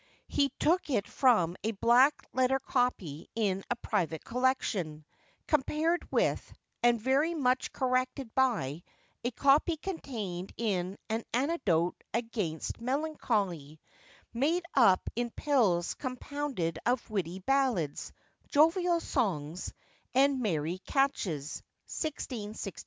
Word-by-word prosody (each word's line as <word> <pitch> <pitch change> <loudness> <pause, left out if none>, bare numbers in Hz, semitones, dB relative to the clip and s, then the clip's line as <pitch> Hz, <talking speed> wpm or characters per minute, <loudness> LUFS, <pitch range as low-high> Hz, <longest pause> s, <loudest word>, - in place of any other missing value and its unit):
He 280 -1 +2
took 345 +1 +2
it 215 -7 0
from 180 -10 +3
a 225 - 0
black 245 +7 +4
letter 260 +1 +3
copy 225 - -1
in 195 -4 0
a 245 - +1
private 180 -9 -2
collection, 215 - -1 0.4
compared 310 +4 +1
with, - - +1 0.3
and 240 -1 +4
very 275 +8 +2
much 255 -4 +1
corrected 255 -1 -1
by, 200 - +1 0.4
a 240 - +1
copy 285 +6 +3
contained 220 - -5
in 195 -4 -1
An 225 +1 -2
Antidote 235 - +1
against 225 -8 -3
Melancholy, 215 - -1 0.5
made 310 +9 +1
up 200 -9 +5
in 240 +1 -1
pills 225 - +1
compounded 255 - -3
of 245 +1 0
witty 185 -5 -2
Ballads, 230 - 0 0.4
jovial 335 +3 +3
Songs, 175 - -2 0.4
and 270 0 +4
merry 170 -4 -1
Catches, 185 - -1 0.2
1661. 220 - -4
240 Hz, 110 wpm, -30 LUFS, 185-275 Hz, 0.5 s, up